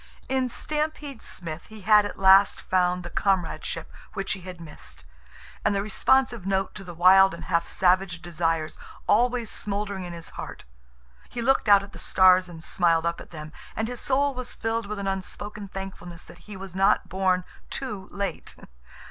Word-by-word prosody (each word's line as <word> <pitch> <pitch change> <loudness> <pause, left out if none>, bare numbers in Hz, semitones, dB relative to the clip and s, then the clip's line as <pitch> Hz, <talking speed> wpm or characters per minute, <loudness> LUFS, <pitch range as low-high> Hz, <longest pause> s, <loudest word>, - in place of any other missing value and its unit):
In 260 -1 0
Stampede 300 -1 -3
Smith 165 -2 -5
he 220 -1 -11
had 210 +1 +5
at - - -9
last 195 +1 +6
found 180 -1 +1
the 175 - -7
comradeship 170 -4 -1 0.2
which 195 -1 -3
he 190 - -7
had 180 -1 -9
missed, 75 - -10 0.6
and 210 - +2
the 195 - +1
responsive 235 +1 +2
note 190 0 0
to 195 - -8
the 175 -2 -9
wild 190 +2 +6
and - - -10
half 170 0 +1
savage 185 -2 +2
desires 165 -2 -2 0.3
always 240 +1 +2
smoldering 200 -1 -3
in 175 - -6
his 170 -1 -8
heart. - - -8 0.6
He 245 - -6
looked 265 -3 +3
out 200 -1 +7
at 200 - -11
the - - -9
stars 185 -1 +5
and 165 -2 -10
smiled 170 -2 +2
up 170 0 -1
at - - -12
them, 155 -2 -8 0.2
and 220 - -1
his 245 0 -6
soul 280 +1 +1
was 255 -1 -5
filled 225 -1 -2
with 210 0 -4
an 200 - -4
unspoken 200 +2 -4
thankfulness 185 -3 -8
that - - -14
he 205 - -7
was 190 -1 -8
not 195 +1 +3
born 185 -1 +1 0.3
too 210 -8 -4
late. 200 0 -4
195 Hz, 180 wpm, -26 LUFS, 175-210 Hz, 0.6 s, out